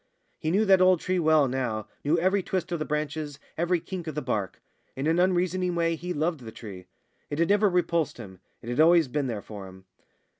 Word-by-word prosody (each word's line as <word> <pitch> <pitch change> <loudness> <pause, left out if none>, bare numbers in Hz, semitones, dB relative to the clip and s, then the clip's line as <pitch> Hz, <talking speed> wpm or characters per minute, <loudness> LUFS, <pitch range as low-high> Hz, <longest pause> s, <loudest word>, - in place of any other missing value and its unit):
He 155 - -2
knew 200 +6 +2
that 190 -2 +5
old 185 -2 +5
tree 185 +2 -1
well 155 -3 +4
now, 125 -5 -2 0.2
knew 150 +4 +2
every 190 +4 +2
twist 185 -1 -3
of 170 - -1
the 155 - -2
branches, 150 -1 -3 0.2
every 175 +2 +1
kink 175 0 -7
of 155 - -4
the 150 - -2
bark. 105 -7 -2 0.4
In 135 - -3
an 165 +2 +2
unreasoning 180 0 +1
way 165 -1 +1
he 180 +3 -6
loved 160 0 -1
the 115 -3 -9
tree. 95 -5 -10 0.4
It 145 - -3
had 170 +1 +2
never 205 0 +4
repulsed 170 -4 0
him; 95 -6 -10 0.2
it 115 - -7
had 120 - -2
always 165 -1 +6
been 140 +1 -1
there 110 -4 -4
for 100 -3 -9
him. 95 0 -14
160 Hz, 220 wpm, -27 LUFS, 130-180 Hz, 0.4 s, always